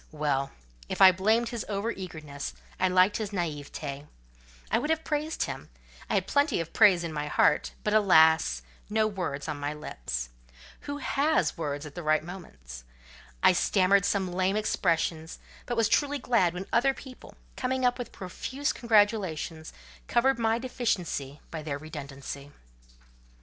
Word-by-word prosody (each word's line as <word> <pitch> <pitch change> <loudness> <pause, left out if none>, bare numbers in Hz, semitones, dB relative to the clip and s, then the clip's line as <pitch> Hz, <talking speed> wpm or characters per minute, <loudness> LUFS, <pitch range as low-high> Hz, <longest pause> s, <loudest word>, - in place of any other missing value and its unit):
Well! 145 -3 -1 0.4
if - - -4
I 190 -1 +10
blamed 220 +6 +2
his 235 -2 -4
over 205 +3 -1
eagerness, 155 -8 -7 0.2
I 185 - +3
liked 185 +2 +4
his 215 -2 -3
naiveté. 150 -5 -4 0.6
I - - +3
would 300 - -3
have 320 0 +1
praised 305 +1 -1
him: - - -6 0.4
I - - +1
had - - +1
plenty 285 - +2
of 165 -1 -5
praise 185 -4 +6
in 165 -2 -4
my 150 -1 -3
heart; 150 - +2
but, 210 - 0
alas! 160 - +5 0.3
no 220 +1 +2
words 180 -9 -3
on 150 -2 -4
my 145 +1 -3
lips. - - -5 0.6
Who 285 - -2
has 295 +1 +1
words 145 -2 -4
at 150 - -9
the 175 - -6
right 155 -1 +2
moment? 70 - -10 0.6
I - - +7
stammered 195 +1 +3
some 195 -3 0
lame 185 +2 +1
expressions; 165 -6 0 0.3
but 240 - -2
was 225 -2 +4
truly 290 +4 +2
glad 225 -10 +2
when 185 +2 -4
other 265 +3 +3
people, 260 -2 -12 0.2
coming 260 0 -1
up 245 +1 +2
with 245 - -5
profuse 260 +10 -3
congratulations, 205 -8 +1 0.4
covered 265 +2 +2
my 225 0 +2
deficiency 185 - -2
by 160 - -5
their 150 -2 -3
redundancy. 140 -2 -8
185 Hz, 155 wpm, -28 LUFS, 150-230 Hz, 0.6 s, I